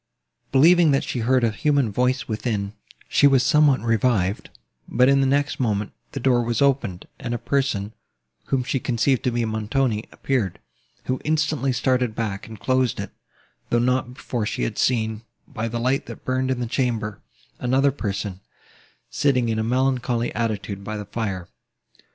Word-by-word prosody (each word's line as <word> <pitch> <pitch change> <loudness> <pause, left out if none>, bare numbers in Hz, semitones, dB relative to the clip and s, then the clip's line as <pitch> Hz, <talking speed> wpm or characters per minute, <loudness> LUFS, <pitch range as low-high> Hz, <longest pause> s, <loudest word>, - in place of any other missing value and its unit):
Believing, 165 +4 +6
that 135 - +2
she 125 - -3
heard 125 +2 +2
a 115 - +3
human 140 -1 +1
voice 125 +4 0
within, 105 -2 -2 0.3
she 145 - +5
was 135 -2 +4
somewhat 150 -2 +4
revived; 115 -4 +1 0.4
but, 125 - +3
in 140 0 +4
the 135 - +3
next 140 +1 +1
moment, 105 -4 0 0.2
the 135 - -3
door 125 -1 +3
was 120 0 -1
opened, 130 -10 +1
and 120 0 -3
a - - -1
person, 120 -7 -1 0.5
whom 135 -2 0
she 135 +1 -1
conceived 125 +2 +1
to - - +4
be 120 -1 0
Montoni, 110 +1 -1
appeared, 120 -10 -1 0.5
who 130 0 -2
instantly 155 -3 +1
started 125 -2 +1
back, 105 -4 -3
and 110 -1 -10
closed 130 -2 +1
it, - - -5 0.6
though 120 - +2
not 125 +1 0
before 120 -5 -3
she - - -2
had - - -2
seen, 110 -3 +1 0.3
by 115 -5 -4
the 115 +1 -3
light 130 +3 0
that - - -10
burned 130 0 0
in 130 -1 0
the - - 0
chamber, 115 -4 -2 0.4
another 135 +3 +2
person, 100 -6 -4 0.7
sitting 125 -5 +2
in 110 -1 0
a - - 0
melancholy 125 -1 0
attitude 105 -3 -3
by 110 +1 -4
the 105 - -6
fire. 100 -4 -4
120 Hz, 170 wpm, -23 LUFS, 110-135 Hz, 0.7 s, Believing